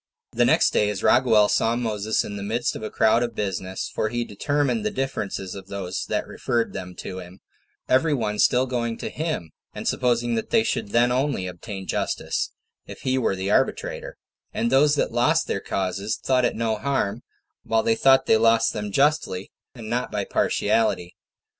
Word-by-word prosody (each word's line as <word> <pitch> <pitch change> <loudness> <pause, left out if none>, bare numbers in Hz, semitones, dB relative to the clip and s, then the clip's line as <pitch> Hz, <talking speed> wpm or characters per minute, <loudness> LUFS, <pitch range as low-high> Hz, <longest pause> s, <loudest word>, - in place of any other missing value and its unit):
1. - - -12
The - - +6
next - - +4
day, 105 - +3
as 105 -1 -4
Raguel 110 -5 +5
saw 115 +2 +2
Moses 110 -3 -1
in 105 - -6
the 100 - -5
middle 115 +4 -1
of - - -6
a 110 - -4
crowd 110 +2 +3
of 120 -2 -2
business 95 -2 -3
for 110 - 0
he 120 +1 -2
determined 145 - -1
the 215 - +1
differences 120 - -3
of 95 -1 -9
those 95 -2 -4
that - - -1
referred 120 -1 -2
them 90 0 -7
to 95 -1 -6
him, 90 +1 -11 0.5
every 140 +5 +3
one 105 -4 -2
still 125 +1 +4
going 120 -3 -2
to - - -5
him, 155 - -3 0.2
and - - -5
supposing 120 -1 +1
that 110 -1 -2
they 225 - +3
should 220 - -2
then 120 +3 +3
only 130 -6 0
obtain 95 +2 -7
justice, - - -2 0.4
if - - -10
he 130 0 +1
were 105 - +1
the 95 +2 -2
arbitrator; - - -1 0.3
and 225 +2 -1
those 145 +2 +5
that - - 0
lost 150 +8 +2
their - - -2
causes 95 +3 -2
thought 130 -2 +1
it - - 0
no 110 -1 0
harm, 120 -4 -1 0.4
while 115 0 +1
they 115 - +3
thought 135 +3 +4
they 110 - +5
lost 115 0 +3
them 105 -1 -4
justly, 140 -8 +1 0.2
and 115 -3 -9
not 120 +2 -2
by 105 -1 -1
partiality. 105 -5 0
115 Hz, 190 wpm, -24 LUFS, 100-130 Hz, 0.5 s, The